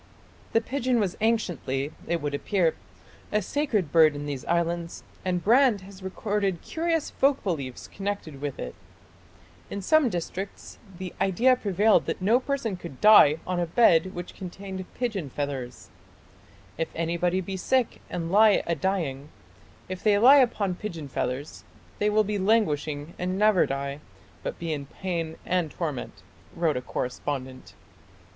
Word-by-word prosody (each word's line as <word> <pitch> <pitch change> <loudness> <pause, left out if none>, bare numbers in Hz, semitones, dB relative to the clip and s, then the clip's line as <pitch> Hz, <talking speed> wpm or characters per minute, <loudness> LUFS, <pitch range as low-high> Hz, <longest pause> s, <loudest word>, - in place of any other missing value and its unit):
The 225 - +4
pigeon 255 0 0
was 195 -4 0
anciently, 165 - 0 0.2
it 170 -2 -1
would 145 -1 -2
appear, 170 +3 +1 0.6
a 210 - +3
sacred 215 - -1
bird 160 -3 +6
in 145 0 -5
these 140 -3 -4
islands, 170 0 -1 0.2
and 180 -2 -1
Brand 240 -2 +4
has 190 0 -13
recorded 195 -1 -2
curious 330 -1 -1
folk 275 0 +2
beliefs 140 -10 -3
connected 195 -8 -5
with 145 -2 -4
it. 60 - -5 1.0
In 200 - -4
some 285 +7 +3
districts 185 +1 -6 0.2
the 185 -1 -6
idea 210 +7 +4
prevailed 210 -1 +2
that - - -2
no 215 +7 +3
person 260 -7 -2
could 170 -7 -10
die 210 -8 +7
on 180 -1 -1
a 175 - 0
bed 185 -2 +4
which 175 0 -6
contained 190 0 -7
pigeon 210 - -2
feathers: 135 -3 -5 0.9
"If 165 - 0
anybody 170 +2 0
be 190 +1 -4
sick 250 +6 0
and 170 -1 -3
lye 210 +1 +5
a 170 - 0
dying, 155 -5 -2 0.6
if 185 0 -6
they 210 -2 +4
lye 255 +7 +8
upon 215 -7 +2
pigeon 170 -7 -6
feathers 130 +3 -3 0.4
they 210 - +2
will 215 +1 +3
be 210 0 -2
languishing 155 -7 +1
and 185 +1 -1
never 210 -2 +4
die, 140 +1 -3 0.4
but - - -4
be 165 -2 -3
in 140 -2 -5
pain 165 -1 -4
and 180 -3 0
torment," 150 -5 -5 0.3
wrote 165 -3 +1
a 125 - -2
correspondent. 130 +1 -5
185 Hz, 150 wpm, -26 LUFS, 155-210 Hz, 1.0 s, lye